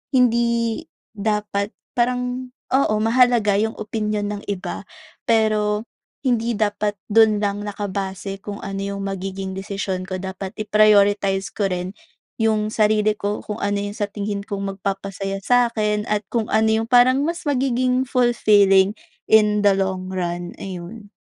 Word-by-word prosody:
hindi, 235 -1 +2 0.3
dapat 210 -1 -1 0.2
parang, 250 +1 -1 0.2
oo, 265 -5 +3
mahalaga 230 -2 +3
yung 220 0 -2
opinyon 210 -1 -2
ng 205 0 -6
iba, 195 0 -4 0.4
pero 215 -1 +2 0.4
hindi 235 -3 +1
dapat 205 -1 0
dun 220 0 +5
lang 205 0 -1
nakabase 195 -1 -4
kung 205 -1 -6
ano 195 0 -4
yung 200 0 -4
magiging 195 0 -4
desisyon 195 -1 -3
ko 185 - -2
dapat 190 0 -6
i-prioritize 205 -2 +3
ko 200 -2 0
rin 180 +1 -3 0.5
yung 215 -1 +1
sarili 215 0 +3
ko 205 +1 -2
kung 210 +1 -5
ano 205 0 0
iyung 205 +1 -4
sa 205 -1 -1
tingin 205 0 -3
kong 200 -1 -4
magpapasaya 195 0 -4
sa 245 -1 +4
akin, 210 -2 0
at 210 -1 0
kung 225 -2 0
ano 220 0 +3
yung 230 - -9
parang 255 +2 +5
mas 335 0 -3
magiging 255 -1 +1
fulfilling, 205 -6 +4 0.4
in 210 -1 +5
the 200 - +6
long 190 -1 -2
run, 175 -1 -3
ayun. 195 +3 -8
210 Hz, 140 wpm, -21 LUFS, 195-225 Hz, 0.5 s, the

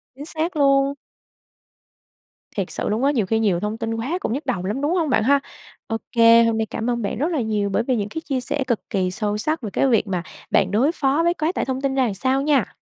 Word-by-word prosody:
Chính 285 +2 -8
xác 325 +2 -2
luôn. 275 -1 +3 1.6
Thiệt - - -2
sự - - -3
luôn 215 +4 0
á, 280 - +4
nhiều 230 -8 0
khi 220 +4 0
nhiều 195 -6 +2
thông 210 +2 -3
tin 225 -1 -3
quá 260 +10 -2
cũng 230 - -2
nhức 285 +2 -4
đầu 215 -9 -2
lắm, 210 +8 -2
đúng 295 +4 +1
hông 325 -5 +1
bạn 220 -3 +2
ha? 280 +3 +4 0.5
Ô 225 - -1
kê, 230 -1 +6
hôm 230 -1 +1
nay 220 - 0
cảm 225 +2 -3
ơn 240 -1 -1
bạn 200 - -3
rất 290 +7 0
là 310 -6 0
nhiều 210 -3 -1
bởi 210 +3 0
vì 255 0 0
những 205 -1 -2
cái 320 - -5
chia 270 -4 -2
sẻ 270 +2 -2
cực 235 -4 +1
kỳ 185 -2 0
sâu 210 +1 -2
sắc 305 +6 -1
về 215 - -4
cái 275 - +2
việc 225 -4 +2
mà 180 -3 -2 0.3
bạn 190 0 +3
đối 250 +9 +3
phó 285 -1 +1
với 345 0 +3
quá 315 0 -1
tải - - -1
thông 260 0 -3
tin 275 -1 -1
ra 265 - +3
làm 220 - -1
sao 260 +7 0
nha. 290 -1 +1
245 Hz, 265 wpm, -22 LUFS, 215-280 Hz, 1.6 s, kê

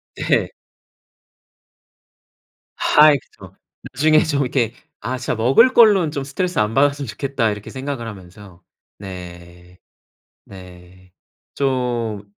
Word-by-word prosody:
네 - - -6
네. - - +2 2.3
아 150 0 +5
그쵸. 140 - -7 0.4
나중에 155 +4 +3
좀 145 -3 -1
이렇게 125 -3 -1 0.3
'아 130 0 -4
진짜 125 - -3
먹을 135 - +4
걸로는 205 -8 +5
좀 140 -2 -4
스트레스 175 +5 -3
안 105 +1 0
받았으면 140 0 +1
좋겠다.' 125 0 -2
이렇게 105 0 -9
생각을 135 -3 -5
하면서. 95 -2 -12 0.4
네. 90 -2 -11 0.7
네. 90 -1 -15 0.4
좀 120 -6 -2
120 Hz, 220 characters per minute, -19 LUFS, 95-140 Hz, 2.3 s, 아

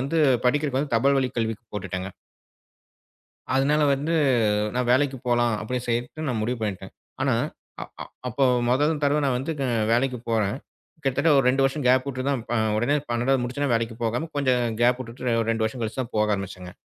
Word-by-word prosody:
வந்து 140 +5 -1 0.3
படிக்கிறது 140 0 0
தபால் 135 +5 +3
வழி 130 -1 +1
கல்விக்கு 115 0 -2
போட்டுட்டேங்க. 95 -2 -4 1.5
அதனால 145 +3 +3
வந்து, 145 +4 -2 0.6
"நான் 125 -1 0
வேலைக்கு 135 +1 +2
போலாம்." 120 -2 +2
அப்படின்னு 125 +3 -3
சொல்லிட்டு 120 +6 -2
நான் 120 -5 -1
முடிவு 120 +2 -2
பண்ணிட்டேன். 95 -3 -4 0.3
ஆனா - - +2 0.5
அ - - -2 0.2
அ - - -3 0.2
அப்போ 125 +3 0 0.3
மொதல் 145 +4 +2
தடவ 145 +1 +3
நான் 130 -2 +1
வந்து 135 +6 -3
க - - 0 0.3
வேலைக்கு 125 +2 +1
போறேன். 110 -1 +1 0.5
கிட்டத்தட்ட 140 +4 +2
ஒரு 135 - +3
2 135 +1 +2
வருஷம் 135 0 -2
கேப் 130 +2 +3
உட்டு 130 -1 -4
தான் 135 -4 0
ப - - -1 0.2
ஒடனே 120 +6 +2
12ஆவது 125 +3 +1
முடிச்சு 125 +4 -5
உடனே 140 -3 +1
வேலைக்கு 115 0 -2
போகாம, 120 +8 -1
கொஞ்சம் 125 -4 +1
கேப் 125 +1 +3
உட்டுட்டு 120 -1 -2
ஒரு 115 - -2
2 115 -1 -1
வருஷம் 120 +2 -4
கழிச்சு 115 +4 -3
தான் 125 -1 -7
போக 105 0 +2
ஆரம்பிச்சேங்க. 95 -2 -7
125 Hz, 180 wpm, -24 LUFS, 115-135 Hz, 1.5 s, தபால்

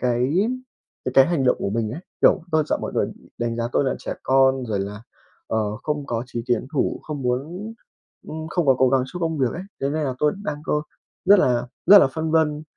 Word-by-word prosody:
cái 125 +3 +1 0.7
về 130 - -2
cái 135 0 +7
hành 165 -6 0
động 125 - +3
của 100 - -2
mình 110 0 -1
ấy. 150 - -6 0.2
Kiểu, 190 - +5
tôi 155 -1 +3
sợ - - 0
mọi - - -4
người - - +1 0.3
đánh 120 -1 -2
giá 115 - -1
tôi - - +2
là 130 - 0
trẻ - - -5
con 130 0 +3
rồi 105 -3 -1
là, 100 +2 -6 0.4
ờ, 105 -1 -1
không 150 -2 -2
có 115 -3 -2
chí 120 -2 -5
tiến 120 -1 0
thủ, 145 - 0
không 145 -3 -5
muốn 160 - -3 0.6
ừm, 160 0 -6
không 170 -1 -1
có 135 - +6
cố 130 - +5
gắng 130 0 +3
cho 180 +6 -8
công 160 -2 -1
việc 130 -3 +2
ấy. 180 - -6 0.2
Thế 135 - 0
nên 155 +1 -1
là 130 -2 -2
tôi 150 +1 +2
đang 150 -7 -4
có 150 -1 0 0.4
rất 205 +1 +7
là 125 -7 +2 0.2
rất 205 - +10
là 185 - +6
phân 160 +4 -3
vân 155 -2 +2
135 Hz, 235 wpm, -23 LUFS, 125-155 Hz, 0.7 s, rất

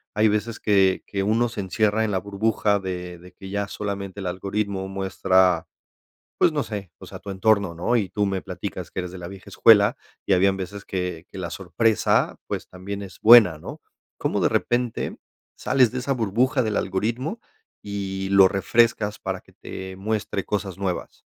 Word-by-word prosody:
Hay 105 +1 +4
veces 105 +1 -1
que 95 -3 +3
que 100 - -3
uno 115 +4 +2
se 115 - -7
encierra 105 +3 +1
en 110 - 0
la 95 - 0
burbuja 100 +1 0
de 90 -2 -5
de 90 0 -14
que 95 +1 -10
ya 100 0 -1
solamente 100 -1 -5
el - - -6
algoritmo 95 +1 -2
muestra, 95 -3 +2 0.7
pues - - +5
no 145 -2 -1
sé, 100 -5 -6
o - - -12
sea, - - -9
tu 100 - -10
entorno, 100 -2 +2
¿no? 90 +9 0
Y 105 -6 +1
tú 105 +3 0
me 95 -1 -1
platicas - - -6
que - - -16
eres 90 -1 -6
de 95 - -9
la 85 - -7
vieja 95 +1 -11
escuela, 110 +2 +5 0.3
y - - +3
habían 95 +1 +3
veces 100 +2 -6
que 90 -3 -4
que - - -10
la 85 -2 -4
sorpresa, 100 +5 +1
pues, - - -4
también 100 +2 -7
es 95 - -11
buena, 110 -9 +8
¿no? - - -9 0.4
¿Cómo - - -1
de - - +3
repente 120 -1 -1 0.4
sales 130 -4 +3
de 130 - -3
esa 135 +2 -1
burbuja 125 +3 +1
del 110 -2 -1
algoritmo 115 - -2 0.4
y 95 -1 -4
lo 100 -1 +7
refrescas 105 +2 +1
para - - -3
que - - -23
te 95 0 -8
muestre 100 0 -2
cosas 100 -3 -3
nuevas? 95 -3 -4
100 Hz, 185 wpm, -24 LUFS, 95-110 Hz, 0.7 s, buena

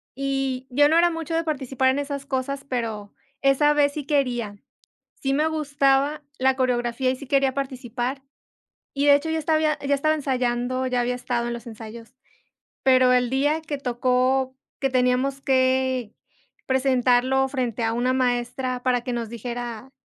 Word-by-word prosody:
y 270 -1 -2
yo 290 +3 +4
no 325 - +4
era 345 0 +4
mucho 325 0 -4
de 330 - +1
participar 265 -4 0
en 270 +2 +1
esas 280 -1 -4
cosas, 275 +1 -3
pero 225 -5 -4 0.3
esa 295 +2 +4
vez 285 -1 +2
sí 295 -3 -5
quería, 245 -8 -1 0.6
sí 270 0 0
me 305 +2 +2
gustaba 290 -1 +1 0.2
la 265 0 +3
coreografía 250 0 0
y - - -2
sí 270 +1 -11
quería 270 -1 +2
participar, 260 -1 -4 0.7
y 280 +1 0
de 285 - +8
hecho 305 +3 0
ya 320 - 0
hasta 315 +1 0
había 310 -1 +1
ya 280 0 0
estaba 310 +3 +2
ensayando, 255 -2 -1
ya 250 -1 0
había 245 +1 0
estado 245 -1 -2
en 235 - -3
los 235 - -9
ensayos, 225 +2 -10 0.7
pero 255 -1 +5
el 250 -1 +2
día 290 +4 +1
que 300 -2 -5
tocó 255 +1 +1 0.3
que 270 - +1
teníamos 255 +2 +1
que 260 -3 +1 0.5
presentarlo 260 0 +2
frente 245 -4 -2
a 225 - +1
una 245 +2 +1
maestra 250 0 -1
para 250 -1 +2
que 250 - -4
nos 235 -1 -3
dijera 240 +1 -6
260 Hz, 170 wpm, -24 LUFS, 245-280 Hz, 0.7 s, de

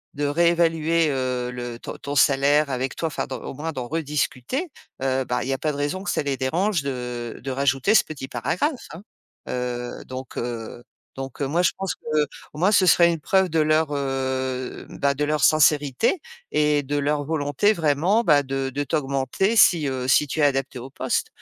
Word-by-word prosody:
de 145 +1 -1
réévaluer, 165 0 +2
heu, 125 -2 -2
le 120 -1 -6
ton - - -7
ton 145 0 -5
salaire 140 +2 +4
avec 130 +1 -2
toi, - - -3
enfin 155 - -3
d'en 130 - -5
au - - -6
moins 155 +4 -4
d'en 125 -4 -5
rediscuter, 150 - -2 0.3
heu, 130 0 0
bah 125 0 -1
il 130 - -5
y - - +1
a - - -1
pas 155 - 0
de - - -6
raison 145 +7 -2
que - - -3
ça - - 0
les 140 -2 -2
dérange 170 - 0
de 125 -3 -5
de 135 - -3
rajouter 135 +6 +1
ce - - +6
petit 140 -4 -7
paragraphe, 170 - -2
hein. 170 +4 -10 0.5
Heu, 125 -1 -4
donc 130 0 -8
heu, 120 0 -5 0.3
donc 135 +1 -7
moi 145 +6 +1
je - - +4
pense 190 -4 -3
qu'au 150 -1 -3
moins 190 +4 +3
ce 190 -3 +5
serait 170 0 +6
une 165 - -3
preuve 190 -1 +2
de 160 0 +1
leur, 155 0 +3
heu, 130 -2 -2
bah 140 0 0
de 150 - -1
leur 150 -2 0
sincérité 150 - +3 0.3
et 150 -1 +2
de 145 +2 -3
leur 145 0 0
volonté 150 +6 +1
vraiment, 170 +7 +2
bah 145 -5 +4
de 135 0 -2
de 145 +2 -2
t'augmenter 140 - 0
si, 170 -9 +5
heu, 130 -1 -3
si 150 +3 +4
tu 155 +3 -2
es - - +3
adaptée 135 -2 +1
au 125 +3 -8
poste - - -1
145 Hz, 200 wpm, -23 LUFS, 130-160 Hz, 0.5 s, ce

